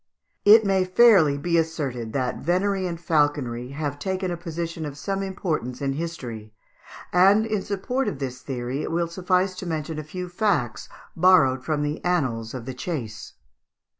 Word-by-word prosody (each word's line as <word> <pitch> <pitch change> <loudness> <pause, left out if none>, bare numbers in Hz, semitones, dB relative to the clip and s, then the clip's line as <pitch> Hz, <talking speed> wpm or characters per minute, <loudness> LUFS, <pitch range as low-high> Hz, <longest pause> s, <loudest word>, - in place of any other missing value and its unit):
] - - -48
It 220 -1 +4
may 190 -1 +3
fairly 185 -7 +5
be 170 +3 +1
asserted 140 -8 -3
that 125 -2 -1
venery 185 +3 0
and 170 -1 -5
falconry 145 -7 0
have 145 -1 -3
taken 190 0 -2
a - - -1
position 170 -1 -5
of 145 -2 -6
some 195 +6 -2
importance 160 - -3
in 135 -1 -1
history; 120 -9 -6 0.6
and 195 +4 +5
in 215 -3 -1
support 205 +8 -2
of 145 - -2
this 130 -2 -5
theory 130 +1 -4
it - - -3
will 170 +1 +1
suffice 185 +2 +1
to 180 - -6
mention 160 -1 -3
a - - -5
few 180 +4 -6
facts 175 - -1 0.3
borrowed 160 -8 +4
from 150 +2 -1
the 150 +2 -3
annals 130 -10 -1
of 120 -3 -6
the 130 - -5
chase. 125 -6 -5
160 Hz, 170 wpm, -24 LUFS, 135-185 Hz, 0.6 s, fairly